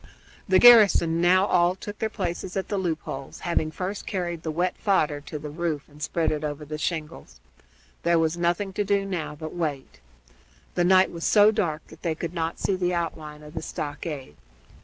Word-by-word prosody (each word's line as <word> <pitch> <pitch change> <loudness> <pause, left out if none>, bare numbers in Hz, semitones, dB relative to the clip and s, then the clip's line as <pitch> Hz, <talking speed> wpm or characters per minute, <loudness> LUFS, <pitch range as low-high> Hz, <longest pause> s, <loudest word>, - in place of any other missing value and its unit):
The 185 - +6
garrison 200 -7 +7
now 185 +2 +5
all 180 -1 +3
took 205 +2 -8
their 220 - -1
places 185 -2 -4
at 190 - -3
the 205 - -1
loop 165 -4 -2
holes, 135 0 -7
having 170 -3 0
first 185 +5 -5
carried 175 -4 -3
the 160 - -4
wet 175 +3 0
fodder 155 -8 +1
to 150 - -5
the 150 0 -7
roof 160 -2 -3
and 150 0 -17
spread 165 +1 0
it 155 0 -3
over 150 0 -4
the 150 +1 -6
shingles. 155 - -4 0.6
There 170 0 +3
was 165 0 +1
nothing 175 +3 -1
to 205 - 0
do 200 0 +1
now 170 -6 -4
but 155 +1 -6
to - - -12
wait. 150 -6 -4 0.7
The 175 - +1
night 185 +1 +5
was 170 -1 -7
so 210 0 +6
dark 170 -8 -2
that - - -15
they 165 -3 -1
could 165 +1 -5
not 165 -1 -2
see 195 - 0
the 180 -1 0
outline 155 -3 -4
of 150 0 -12
the 160 - -4
stockade. 145 - -6
170 Hz, 200 wpm, -25 LUFS, 155-185 Hz, 0.7 s, garrison